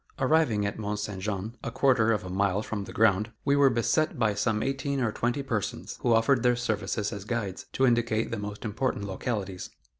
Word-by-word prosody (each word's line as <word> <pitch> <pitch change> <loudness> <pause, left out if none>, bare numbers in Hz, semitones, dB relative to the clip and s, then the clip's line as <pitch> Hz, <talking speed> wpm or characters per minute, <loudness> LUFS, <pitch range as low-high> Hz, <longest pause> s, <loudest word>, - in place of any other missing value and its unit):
Arriving 130 -7 +2
at 100 - -3
Mont 105 -1 -2
Saint 105 -2 -4
Jean, 105 +3 -3
a - - -2
quarter 120 -2 +3
of 105 - 0
a 90 - -7
mile 100 +2 +1
from 105 -3 -4
the - - -9
ground, 105 0 +2
we 140 0 +3
were 140 -1 +6
beset 140 +7 +1
by 110 -3 +2
some 105 +1 0
eighteen 135 +1 -1
or 120 -4 +1
twenty 120 +5 -1
persons, 115 -6 -3
who 120 - +2
offered 115 +3 +4
their 125 0 +3
services 105 -2 -2
as 100 -2 -6
guides, 105 -4 -3
to 130 - +2
indicate 115 -2 +1
the 115 - -2
most 105 +1 -6
important 115 0 -1
localities. 100 -1 -4
110 Hz, 205 wpm, -28 LUFS, 105-125 Hz, -, were